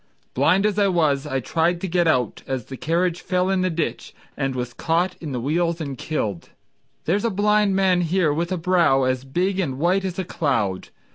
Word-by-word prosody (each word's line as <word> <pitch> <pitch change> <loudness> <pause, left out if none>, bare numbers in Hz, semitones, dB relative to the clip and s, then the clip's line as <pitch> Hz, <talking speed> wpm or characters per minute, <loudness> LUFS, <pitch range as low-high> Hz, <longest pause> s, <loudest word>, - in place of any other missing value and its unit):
Blind 190 +5 +3
as 210 -1 +1
I 200 - +4
was, 155 -6 +1
I 135 -2 -1
tried 165 +6 0
to 190 - -2
get 175 -1 +1
out 125 -8 +1
As 130 -4 -3
the 135 - -8
carriage 170 +6 0
fell 185 0 0
in 190 -1 +1
the 185 - +1
ditch, 165 -2 -3 0.2
And 135 -2 -2
was 125 -1 -4
caught 175 +3 0
in 155 -4 -5
the 125 - -2
wheels 165 +6 0
and 140 -4 -4
killed. 110 - -3 0.6
There's 195 +5 +1
a 230 - +2
blind 210 0 +2
man 190 -2 +3
here 170 -2 +1
with 170 +4 -2
a 185 - 0
brow 165 -6 +3
As 130 0 0
big 180 +8 -1
and 135 -9 -1
white 180 +6 +1
as 185 -2 -4
a 190 - -2
cloud. 115 - -1
170 Hz, 210 wpm, -22 LUFS, 135-185 Hz, 0.6 s, I